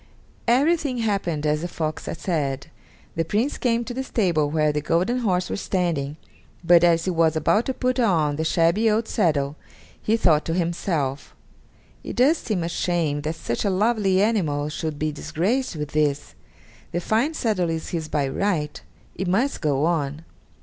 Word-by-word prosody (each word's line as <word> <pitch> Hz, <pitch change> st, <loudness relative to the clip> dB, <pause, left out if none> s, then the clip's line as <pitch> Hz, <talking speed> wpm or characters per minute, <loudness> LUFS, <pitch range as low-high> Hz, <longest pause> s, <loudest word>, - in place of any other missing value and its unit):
Everything 280 Hz, +2 st, +2 dB
happened 195 Hz, -9 st, -1 dB
as 150 Hz, 0 st, +1 dB
the 175 Hz, -, -2 dB
fox 155 Hz, -3 st, -4 dB
had -, -, -4 dB
said. 150 Hz, -4 st, -2 dB, 0.4 s
The 165 Hz, -, +1 dB
Prince 220 Hz, -, -1 dB
came 235 Hz, -1 st, +1 dB
to 245 Hz, -, -5 dB
the 265 Hz, +2 st, -3 dB
stable 175 Hz, -, +1 dB
where 155 Hz, 0 st, +2 dB
the 150 Hz, 0 st, -2 dB
golden 180 Hz, -, +1 dB
horse 185 Hz, -6 st, 0 dB
was -, -, -4 dB
standing, 160 Hz, -6 st, -1 dB, 0.5 s
but, 170 Hz, 0 st, +6 dB
as 170 Hz, -1 st, +4 dB
he 185 Hz, -, +1 dB
was 165 Hz, -2 st, +2 dB
about 210 Hz, +8 st, +2 dB
to 265 Hz, -, 0 dB
put 255 Hz, 0 st, 0 dB
on 165 Hz, -11 st, +2 dB
the 160 Hz, -, -2 dB
shabby 170 Hz, +7 st, +3 dB
old 220 Hz, +1 st, +1 dB
saddle, 150 Hz, -7 st, 0 dB, 0.4 s
he 220 Hz, +2 st, +1 dB
thought 160 Hz, -8 st, +3 dB
to 165 Hz, -, -1 dB
himself, 165 Hz, -5 st, -2 dB, 0.7 s
"It -, -, -6 dB
does 280 Hz, +7 st, +4 dB
seem 200 Hz, -7 st, -2 dB
a -, -, -1 dB
shame 165 Hz, -4 st, -1 dB
that 155 Hz, +2 st, -3 dB
such 120 Hz, -7 st, -3 dB
a 200 Hz, -, +1 dB
lovely 195 Hz, -1 st, +2 dB
animal 155 Hz, -10 st, 0 dB
should 155 Hz, -1 st, -4 dB
be 155 Hz, +1 st, -1 dB
disgraced 175 Hz, -, -1 dB
with 150 Hz, -2 st, -4 dB
this. 150 Hz, -2 st, 0 dB, 0.6 s
The 175 Hz, -, -1 dB
fine 230 Hz, -, 0 dB
saddle 205 Hz, -, 0 dB
is 160 Hz, -1 st, -3 dB
his 160 Hz, -3 st, -3 dB
by 145 Hz, -3 st, 0 dB
right; 150 Hz, 0 st, -1 dB, 0.3 s
it 190 Hz, -, -4 dB
must 235 Hz, +10 st, +1 dB
go 145 Hz, -2 st, +1 dB
on." 155 Hz, -2 st, -1 dB
170 Hz, 175 wpm, -23 LUFS, 155-215 Hz, 0.7 s, but